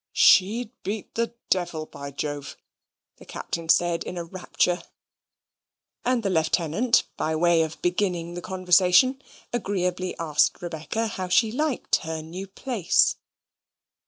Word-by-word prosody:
"She'd 215 +4 +4
beat 205 +1 -5
the 230 0 -2 0.2
devil, 175 -4 0
by 140 -2 -8
Jove!" 145 0 -5 0.6
the - - -14
Captain 165 -1 -5
said, 170 0 +3
in 180 - -6
a 170 - -3
rapture; 180 0 -1 1.2
and 250 -2 +1
the 195 - 0
Lieutenant, 170 +7 +2
by 160 0 -1
way 170 0 +3
of 160 -1 -3
beginning 175 -2 0
the 175 - -6
conversation, 185 +8 +3 0.3
agreeably 185 -5 -2
asked 155 -3 +1
Rebecca 175 +6 -3
how 190 -4 -4
she 215 +5 +3
liked 295 +2 0
her 160 -1 -5
new 180 +5 -7
place. 200 - +1
180 Hz, 130 wpm, -25 LUFS, 165-205 Hz, 1.2 s, She'd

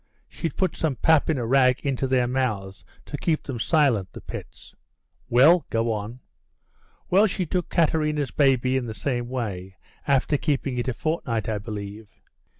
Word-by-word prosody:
She'd 165 - -5
put 185 - 0
some 155 -5 -1
pap 160 +6 +3
in 155 - +1
a 120 - -2
rag 130 +1 +3
into 135 -1 -1
their 130 -1 +2
mouths 110 -7 -2 0.2
to 145 - -6
keep 160 -3 -1
'em 130 -4 -4
silent, 125 - +2
the - - -8
pets." - - -10 0.6
"Well, 150 +8 +5
go 115 0 0
on." 110 +4 -5 0.9
"Well, 200 +4 +5
she 185 -1 -2
took 180 +1 -2
Katerina's 150 -4 +1
baby 130 -2 +2
in 125 -2 -3
the 110 - -6
same 120 -2 -2
way, 95 -7 -4 0.3
after 140 +1 +2
keeping 135 -3 -1
it 120 - -3
a 130 - 0
fortnight, 120 -8 -2
I 110 -2 -1
believe. 105 0 -7
130 Hz, 165 wpm, -24 LUFS, 115-150 Hz, 0.9 s, Well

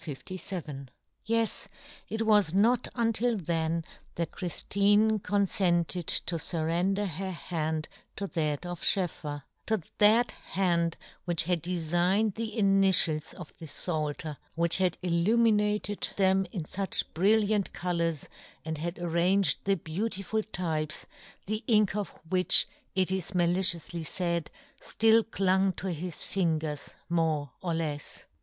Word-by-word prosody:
^^% 150 -1 -6 1.2
it 225 - -3
was 210 -6 +3
not 225 +4 +3
until 230 0 +1
then 165 -2 -1 0.3
that 170 -2 -2
Chriftine 205 +4 +2
confented 180 -4 0
to 170 -2 0
fur 160 0 -2
render 185 +5 0
her 190 +1 -4
hand 160 -3 -3 0.3
to 200 - -4
that 155 -4 -2
of 175 -1 -6
SchoefFer 150 -6 -1
— - - -47
to 220 -1 +1 0.2
that 220 +4 +5
hand 170 -2 -1 0.3
which 170 -2 +2
had 175 -1 0
deligned 180 +5 +1
the 225 +1 -5
initials 195 -6 +4
of 175 -4 -10
the 165 - -8
Pfalter, 150 -1 -2 0.2
which 170 +2 +5
had 185 -2 +1
il 180 - -1
luminated 210 -1 +2
them 190 -1 +3
in 180 - -4
fuch 190 +5 -1
brilliant 210 +3 +2
colours, 170 -4 -2 0.4
and 160 -2 -4
had 170 +3 -4
arranged 175 +3 +2
the 195 0 +3
beau 170 +5 -3
tiful 220 +1 -3
types, 155 -4 -2 0.4
the 215 +3 -2
ink 210 -4 +3
of 205 -3 -2 0.2
which, 180 +1 +4 0.3
it 185 -1 +2
is 190 0 -1
malicioufly 175 -2 +2
faid, 170 -3 -1 0.3
ftill 225 0 +3
clung 190 -1 +2
to 190 0 -4
his 170 0 -4
fingers 160 -5 -2
more 160 -5 0
or 175 -3 -2
lefs. 150 -3 -4
180 Hz, 130 wpm, -29 LUFS, 165-200 Hz, 1.2 s, that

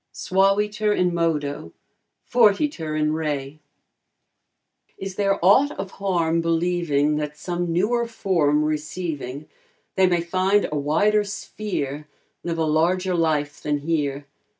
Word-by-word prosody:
Suaviter 210 +3 +1
in 180 -3 +1
modo, 150 - -2 0.5
fortiter 210 - +2
in 155 0 +1
re. 150 -2 -3 1.4
Is 195 0 -6
there 195 0 +1
aught 260 +9 +6
of 195 0 -5
harm 170 -4 +1
believing 165 -3 +1
That 150 0 -4
some 175 +1 -3
newer 230 +8 +1
form 160 -9 +1
receiving, 150 -2 -4 0.5
They 190 -1 +4
may 175 -1 +1
find 185 +4 +1
a - - -2
wider 165 +9 +2
sphere, 190 -7 -5 0.4
Live 170 -1 -3
a 160 - +1
larger 180 +4 +1
life 155 -3 0
than 150 0 0
here? 145 -3 -1
170 Hz, 120 wpm, -23 LUFS, 150-195 Hz, 1.4 s, aught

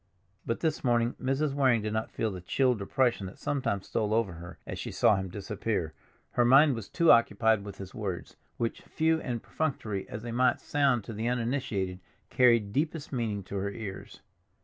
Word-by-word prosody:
But 115 - -1
this 160 -2 0
morning 120 -1 +2
Mrs. 135 +2 0
Waring 130 -6 +3
did 105 0 -2
not 110 0 -1
feel 110 - -2
the 90 -2 -7
chill 125 +8 +2
depression 115 0 0
that 95 - -11
sometimes 115 -9 -2
stole 110 -1 0
over 110 -6 +1
her 85 +2 -10
as - - -6
she - - -4
saw 105 - +4
him 95 -1 -3
disappear; 100 -3 -3 0.4
her 120 - +2
mind 135 +4 +6
was 115 -4 -6
too 170 -1 +4
occupied 110 -2 +4
with 100 -1 -8
his 95 -1 -9
words, 100 -5 -5 0.2
which, 115 -1 -2
few 160 0 0
and 120 -3 -4
perfunctory 110 -10 -3
as 110 - -6
they 120 - -5
might 125 +2 +2
sound 135 -6 +1
to 115 - -7
the 110 +2 -2
uninitiated, 115 -7 -1 0.3
carried 115 -5 +4
deepest 150 +1 -2
meaning 110 -5 -2
to 100 +2 -6
her 100 +1 -1
ears. 100 -2 -8
115 Hz, 190 wpm, -29 LUFS, 100-130 Hz, 0.4 s, mind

